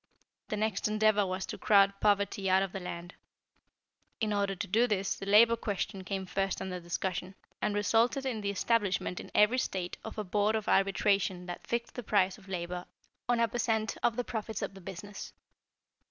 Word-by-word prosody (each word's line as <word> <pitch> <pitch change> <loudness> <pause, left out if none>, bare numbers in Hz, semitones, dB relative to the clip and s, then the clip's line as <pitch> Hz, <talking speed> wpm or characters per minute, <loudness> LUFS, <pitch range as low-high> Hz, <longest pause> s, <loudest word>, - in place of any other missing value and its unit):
The 215 - -3
next 215 -2 0
endeavor 215 -1 +3
was 185 +1 -3
to - - -7
crowd 200 -1 +5
poverty 200 -2 +2
out 190 +1 +4
of 195 - -4
the 195 - -5
land. 175 0 -7 1.1
In 215 -2 0
order 200 -1 0
to 185 - -3
do 230 +6 +3
this 195 -3 0
the 195 - -8
Labor 225 +3 +7
question 200 -3 -3
came 190 0 -3
first 195 +1 -1
under 185 -1 -4
discussion, 180 +2 -3 0.3
and 210 -1 0
resulted 230 +6 +2
in 235 -5 -2
the 200 - -1
establishment 200 -3 0
in - - -9
every 220 +5 +5
state 180 -6 -3
of 220 - -8
a 215 - -1
Board 210 +3 +1
of 215 -2 -2
Arbitration 195 -2 +2
that 175 -1 -7
fixed 235 0 -2
the 245 - -5
price 200 -3 +1
of 195 -1 -17
labor 180 -1 -4 0.4
on 240 -1 +3
a 230 - +4
per 240 +2 -4
cent, 220 -2 0
of 230 - +2
the 245 - -1
profits 220 -2 -4
of - - -4
the 195 - -12
business. 195 +2 -8
200 Hz, 195 wpm, -31 LUFS, 190-220 Hz, 1.1 s, Labor